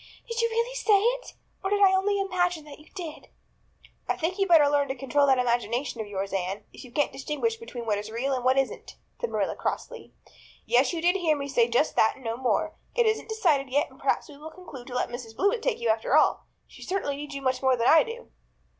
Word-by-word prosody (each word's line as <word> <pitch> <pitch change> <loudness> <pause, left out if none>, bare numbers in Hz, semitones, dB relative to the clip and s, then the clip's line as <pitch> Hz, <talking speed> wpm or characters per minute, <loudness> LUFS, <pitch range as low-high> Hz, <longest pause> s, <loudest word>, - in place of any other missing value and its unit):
"Did 465 0 -2
you 465 - +2
really 465 +2 -1
say 440 -5 +3
it? - - -1 0.3
Or 385 - -1
did 410 0 +1
I 390 -2 +6
only 400 +1 +2
imagine 355 -4 0
that 295 -1 -12
you 300 - -18
did?" 335 -5 -7 0.8
"I - - 0
think 360 +4 -2
you'd 390 - +2
better 320 -4 +7
learn 285 -1 +2
to 265 - -3
control 275 +2 +1
that 265 -1 +4
imagination 240 0 -1
of 215 - -6
yours, 195 -1 -4
Anne, 190 +1 -2
if - - -11
you 250 - -13
can't 290 +4 +1
distinguish 375 +12 -2
between 255 - -8
what 210 -2 0
is 210 +1 -7
real 245 +5 -1
and 255 -2 -2
what 260 +1 +3
isn't," 270 -1 -2 0.2
said 475 -1 -2
Marilla - - -1
crossly. - - -5 0.5
"Yes, 250 +3 +3
you 335 -2 -4
did 355 +3 +4
hear 320 -5 +1
me 280 0 -4
say 240 -4 +3
just 245 +6 +1
that 220 - +4
and 265 - -16
no 225 0 -1
more. 260 +6 0 0.2
It 475 -1 +3
isn't 435 0 0
decided 310 -11 +1
yet 290 +5 0
and - - -18
perhaps - - 0
we 290 - -13
will 305 +2 -9
conclude 315 -8 -11
to 250 - -7
let 250 - 0
Mrs. 240 -2 -8
Blewett 405 - +1
take - - 0
you 235 - -1
after 225 +6 +2
all. 310 - +2 0.2
She - - -16
certainly 370 -7 -2
needs 290 0 -7
you 275 - -6
much 260 -1 0
more 260 -1 +3
than 235 +1 +1
I 320 - +7
do." 475 0 -7
290 Hz, 245 wpm, -27 LUFS, 250-390 Hz, 0.8 s, better